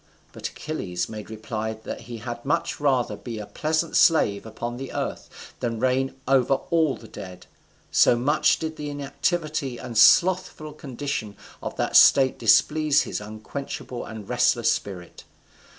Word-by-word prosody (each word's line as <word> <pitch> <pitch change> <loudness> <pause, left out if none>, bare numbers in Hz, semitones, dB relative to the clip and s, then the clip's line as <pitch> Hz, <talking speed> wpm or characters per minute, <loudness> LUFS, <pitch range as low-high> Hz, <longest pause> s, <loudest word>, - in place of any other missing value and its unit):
But - - -5
Achilles 90 - -4
made 110 -1 -8
reply 110 0 -4
that 110 0 -8
he 120 0 -8
had 120 +1 -6
much 145 - -1
rather 135 -4 +1
be 115 -3 -7
a 105 - -6
peasant 155 +7 -1
slave 115 - +4
upon 120 +2 -5
the 135 +1 -6
earth - - -6
than 115 -2 -2
reign 130 +2 +1
over 135 0 +4 0.2
all 160 -5 +3
the 115 - -13
dead. 90 -3 -10 0.5
So - - +5
much 145 +6 +2
did 160 -1 -5
the 150 0 -5
inactivity 145 -1 -2
and 120 - -8
slothful 155 +4 +4
condition 135 -7 -5 0.2
of - - -5
that - - -2
state 135 -2 +6
displease 145 +7 +4
his - - -4
unquenchable 115 +4 -6
and 110 -2 -9
restless 120 -1 +2
spirit. 90 -4 -5
125 Hz, 150 wpm, -24 LUFS, 110-145 Hz, 0.5 s, state